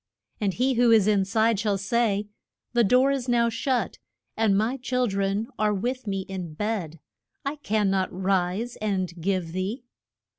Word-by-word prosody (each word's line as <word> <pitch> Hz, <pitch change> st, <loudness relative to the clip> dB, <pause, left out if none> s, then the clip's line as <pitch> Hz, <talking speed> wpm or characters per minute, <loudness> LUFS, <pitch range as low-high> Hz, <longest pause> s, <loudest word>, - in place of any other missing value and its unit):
And 200 Hz, -4 st, 0 dB
he 260 Hz, +2 st, +2 dB
who 240 Hz, 0 st, +4 dB
is 220 Hz, -4 st, +6 dB
in 205 Hz, -2 st, +3 dB
side 220 Hz, +2 st, +2 dB
shall 205 Hz, -2 st, +1 dB
say, 205 Hz, 0 st, 0 dB, 0.5 s
The 240 Hz, -1 st, +4 dB
door 255 Hz, +6 st, +4 dB
is 265 Hz, -2 st, -2 dB
now 235 Hz, -1 st, +3 dB
shut, 250 Hz, +2 st, -1 dB, 0.4 s
and 215 Hz, -3 st, +3 dB
my 225 Hz, +6 st, 0 dB
chil 255 Hz, -1 st, 0 dB
dren 200 Hz, 0 st, 0 dB
are 210 Hz, -1 st, +2 dB
with 245 Hz, +4 st, -3 dB
me 195 Hz, -1 st, -1 dB
in 185 Hz, -4 st, -6 dB
bed; 185 Hz, -6 st, -3 dB, 0.5 s
I 285 Hz, +2 st, -2 dB
can 215 Hz, -7 st, 0 dB
not 190 Hz, -1 st, 0 dB
rise 190 Hz, +4 st, -1 dB
and 190 Hz, -4 st, -1 dB
give 185 Hz, -2 st, -1 dB
thee. 190 Hz, +8 st, -3 dB
210 Hz, 170 wpm, -26 LUFS, 195-240 Hz, 0.5 s, is